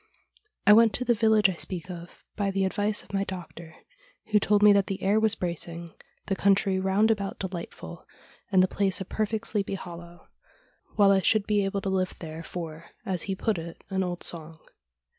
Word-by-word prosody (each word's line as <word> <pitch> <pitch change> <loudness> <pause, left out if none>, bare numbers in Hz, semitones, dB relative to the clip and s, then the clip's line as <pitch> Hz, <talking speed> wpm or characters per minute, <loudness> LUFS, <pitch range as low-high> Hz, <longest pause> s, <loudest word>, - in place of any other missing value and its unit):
I 210 - +8
went 225 0 +6
to 250 - -3
the 240 - +4
village 220 -2 +4
I 190 - -1
speak 180 +1 -4
of 175 0 -10
by 200 -2 0
the 195 0 0
advice 205 +2 -1
of - - -17
my 195 0 +1
doctor, 170 -4 -8 0.6
who 210 - +5
told 205 0 +2
me 210 -1 +8
that 200 -1 +2
the 195 - -4
air 200 +3 +3
was 220 -1 +2
bracing, 170 -1 -4 0.3
the 195 - -1
country 195 -1 +2
round 195 +4 +3
about 200 -3 -2
delightful, 180 -3 -7 0.4
and 185 -1 +5
the - - +3
place 195 0 0
a 190 - -4
perfect 220 +3 -2
sleepy 200 -2 -1
hollow, 175 -2 -10 0.7
while 200 -2 +5
I 195 -1 +4
should 215 +1 +2
be 210 -2 +2
able 195 0 -2
to 195 - -2
live 185 -1 -1
there 160 -1 -7
for, 165 -2 -7 0.2
as 185 -2 -2
he 190 - 0
put 205 -1 -1
it, 165 0 -9
' - - -40
an 190 0 0
old 175 -1 -3
song.' 160 -1 -5
195 Hz, 200 wpm, -27 LUFS, 175-205 Hz, 0.7 s, I